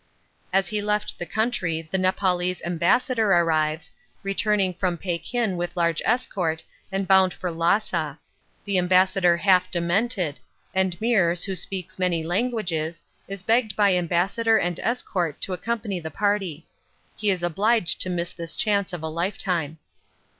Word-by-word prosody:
As 190 -1 +2
he 210 -1 -1
left 210 0 -1
the 175 - -4
country 190 -6 -1
the 190 - +1
Nepaulese 185 -1 +1
ambassador 215 +6 +2
arrives, 160 -2 +1 0.3
returning 195 -1 +1
from 180 -1 -1
Pekin 185 +4 -2
with 175 +1 -4
large 170 -2 +1
escort 185 -9 0 0.3
and 195 0 -2
bound 190 -3 +5
for 180 +2 -4
Lhassa: 165 -3 0 0.5
the 200 -2 +2
ambassador 180 -1 +3
half 185 0 +3
demented: 175 -2 0 0.3
and 185 -2 0
Meares, 190 -7 +2
who 195 - -2
speaks 185 0 -4
many 175 -3 +1
languages, 175 -4 -2 0.2
is 195 -1 -7
begged 225 -1 +2
by 200 -2 +4
ambassador 185 +6 +2
and 175 -3 -1
escort 185 - -2
to 190 - -2
accompany 205 +1 -3
the 160 -1 -6
party. 195 -3 -1 0.5
He 210 - 0
is 185 -3 0
obliged 195 +3 +2
to 185 - -1
miss 175 -1 -2
this 170 -2 -6
chance 200 -3 0
of 170 -3 -5
a - - -2
lifetime. 170 -2 -2
185 Hz, 145 wpm, -24 LUFS, 170-205 Hz, 0.5 s, bound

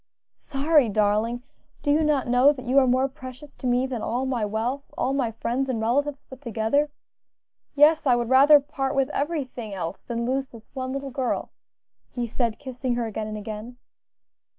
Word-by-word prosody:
"Sorry, 285 -2 +2
darling! 215 +4 +1 0.4
do 290 - +2
you 310 +2 +3
not 295 -4 +1
know 250 +4 +5
that 255 -3 -10
you 260 +3 +4
are 260 - +3
more 255 +2 +3
precious 265 +1 -11
to 255 - -4
me 245 +1 +2
than 255 -4 -4
all 245 +5 -1
my 250 -4 -1
wealth, 230 +7 -2
all 265 - 0
my 265 -4 0
friends 245 +4 -2
and 240 -3 -1
relatives 275 +6 0
put 265 0 -13
together? 240 +4 0 0.9
Yes, 300 +1 +5
I 250 - +5
would 240 -1 -1
rather 280 +3 +7
part 280 -1 -3
with 270 +1 +1
everything 265 -8 -3
else 175 0 -5
than 235 -1 -3
lose 265 +2 -1
this 230 -4 -15
one 260 -1 -4
little 275 0 -4
girl," 255 -1 -2 0.6
he 245 -1 -3
said, 230 -1 -1
kissing 255 -2 -3
her 240 -1 -1
again 220 -1 -4
and 215 0 -5
again. 215 +3 -7
255 Hz, 185 wpm, -25 LUFS, 235-275 Hz, 0.9 s, rather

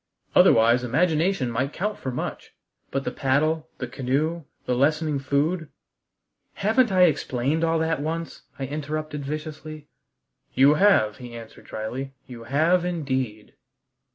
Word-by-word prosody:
"Otherwise 115 +2 +5
imagination 160 +2 +1
might 130 +5 -1
count 210 +4 -2
for 135 - -5
much. 125 - -5 0.3
But 135 0 -2
the - - -2
paddle, 155 +4 0
the 125 - -3
canoe, 140 +6 -1 0.2
the 125 - 0
lessening 150 +3 +1
food 150 +4 0 0.4
" - - -53
"Haven't 225 +2 +3
I 185 -1 +5
explained 145 -1 +1
all 165 0 +2
that 160 -2 0
once?" 165 +2 -4 0.2
I 135 - -3
interrupted 150 +1 -4
viciously. 155 +1 -6 0.7
"You 140 +2 +6
have," 150 - +4
he 120 -2 -9
answered 115 -1 -11
dryly; 130 +5 -5
"you 120 -3 -10
have 160 +8 +2
indeed." 130 -11 -3
150 Hz, 135 wpm, -25 LUFS, 130-160 Hz, 0.7 s, You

